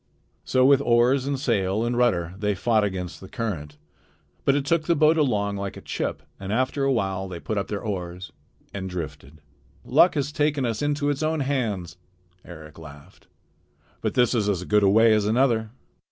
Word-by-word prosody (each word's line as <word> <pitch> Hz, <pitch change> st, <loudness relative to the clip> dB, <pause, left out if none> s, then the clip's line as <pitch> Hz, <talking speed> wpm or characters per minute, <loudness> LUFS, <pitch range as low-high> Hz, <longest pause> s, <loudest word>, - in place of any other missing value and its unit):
So 130 Hz, 0 st, +2 dB
with 140 Hz, 0 st, +5 dB
oars 125 Hz, +2 st, +3 dB
and 140 Hz, -1 st, -1 dB
sail 110 Hz, -5 st, 0 dB
and 120 Hz, +1 st, -1 dB
rudder 90 Hz, -9 st, +1 dB
they 105 Hz, -1 st, 0 dB
fought 110 Hz, +3 st, +2 dB
against 95 Hz, -3 st, -4 dB
the 95 Hz, -, -11 dB
current, 75 Hz, -10 st, -5 dB, 0.7 s
but 140 Hz, -, +4 dB
it 140 Hz, -1 st, -1 dB
took 155 Hz, +1 st, +1 dB
the 170 Hz, -, +3 dB
boat 155 Hz, +1 st, +4 dB
along 105 Hz, -10 st, 0 dB
like 100 Hz, 0 st, -5 dB
a -, -, -9 dB
chip, -, -, -4 dB, 0.2 s
and 100 Hz, 0 st, -6 dB
after 130 Hz, +4 st, 0 dB
a 135 Hz, -, +2 dB
while 95 Hz, -5 st, -1 dB
they 90 Hz, -2 st, -7 dB
put 110 Hz, -, -4 dB
up 100 Hz, -, -4 dB
their 105 Hz, +1 st, -4 dB
oars 90 Hz, -4 st, -5 dB, 0.4 s
and 95 Hz, -1 st, -5 dB
drifted. 75 Hz, -4 st, -7 dB, 0.4 s
"Luck 175 Hz, -, +4 dB
has 145 Hz, 0 st, -1 dB
taken 145 Hz, -2 st, 0 dB
us 115 Hz, -2 st, -2 dB
into 145 Hz, 0 st, 0 dB
its 145 Hz, 0 st, -3 dB
own 155 Hz, 0 st, 0 dB
hands," 110 Hz, -11 st, -2 dB, 0.5 s
Eric 80 Hz, -2 st, -12 dB
laughed. 75 Hz, -2 st, -14 dB, 0.7 s
"But -, -, -2 dB
this 125 Hz, 0 st, +3 dB
is 105 Hz, -4 st, +1 dB
as 95 Hz, -3 st, -1 dB
good 105 Hz, +3 st, +2 dB
a 100 Hz, -, +4 dB
way 110 Hz, +2 st, +5 dB
as 105 Hz, -1 st, +2 dB
another." 115 Hz, -1 st, +2 dB
110 Hz, 190 wpm, -24 LUFS, 95-135 Hz, 0.7 s, with